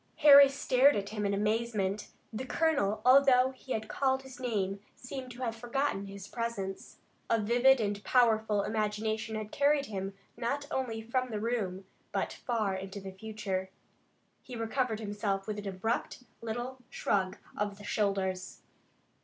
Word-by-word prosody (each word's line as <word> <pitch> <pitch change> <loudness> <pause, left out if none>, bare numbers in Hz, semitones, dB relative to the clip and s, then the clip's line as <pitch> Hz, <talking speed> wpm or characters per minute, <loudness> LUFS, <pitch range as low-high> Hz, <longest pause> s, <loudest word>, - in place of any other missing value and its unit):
Harry 280 -1 +10
stared 275 0 +4
at 200 -1 -2
him 210 -1 -2
in 200 - 0
amazement. 210 -1 0 0.3
The 230 +4 -3
colonel, 270 -10 +1
although 260 -1 +6
he 260 0 -5
had 220 0 -3
called 265 +1 0
his 265 -1 -11
name, 200 -6 -1 0.2
seemed 255 0 -7
to 250 +2 -7
have 230 -2 -2
forgotten 240 -3 -1
his 200 0 -9
presence. 205 -5 -4 0.3
A 230 - +3
vivid 245 +5 +4
and 205 -2 -2
powerful 220 -4 +3
imagination 220 +1 -1
had 215 0 -5
carried 285 0 +3
him 195 -3 -5 0.2
not 265 +5 -2
only 230 -4 -2
from 255 +2 -1
the 215 -3 -3
room, 205 -5 -2 0.3
but - - -1
far 220 -5 -1
into 195 +1 -5
the 190 -1 -7
future. 195 -2 -4 0.7
He 250 - -9
recovered 225 0 -1
himself 205 -2 -2
with 210 -1 -3
an 205 - -6
abrupt 225 +6 -2 0.2
little 240 +3 -4
shrug 190 -5 0 0.2
of 205 -1 -2
the 205 - -12
shoulders. 195 -3 -1
220 Hz, 155 wpm, -31 LUFS, 200-250 Hz, 0.7 s, Harry